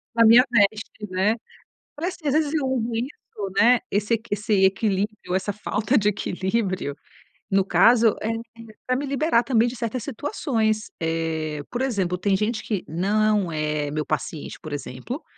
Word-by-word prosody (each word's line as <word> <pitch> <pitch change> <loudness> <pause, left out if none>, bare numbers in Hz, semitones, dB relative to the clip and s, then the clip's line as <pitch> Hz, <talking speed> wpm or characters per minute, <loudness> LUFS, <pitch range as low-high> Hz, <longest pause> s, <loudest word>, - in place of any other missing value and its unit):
A 230 0 +6
minha 230 +3 +8
veste, 210 -1 +1
né. 190 +4 +2 0.6
Parece 345 +5 -3
que, 310 - -5
às 275 - +2
vezes, 305 -1 +1
eu 300 -4 +1
uso 245 -3 -1
isso, 225 -4 -5
né. 240 +1 +6
Esse 210 +3 +1
equi 225 +1 -10
esse 210 +1 -1
equilíbrio, 195 0 0
essa 190 +2 0
falta 210 +4 0
de 210 -2 +3
equilíbrio, 190 -5 -2 0.5
no 195 0 +3
caso, 230 +1 +5
é 220 - -1
é 230 -1 -7
pra 255 - +1
me 280 +3 -2
liberar 275 -3 +2
também 235 -3 +3
de 240 - -4
certas 230 0 -3
situações. 225 -5 -1
Eh, 160 -2 -2
por 245 +1 -2
exemplo, 195 -9 0
tem 195 +2 +1
gente 215 +3 -1
que 205 -5 -2
não 205 +2 +1
é 150 -2 -1
meu 150 0 -2
paciente, 155 0 -4
por 155 - -8
exemplo, 145 - -6
215 Hz, 170 wpm, -24 LUFS, 190-235 Hz, 0.6 s, minha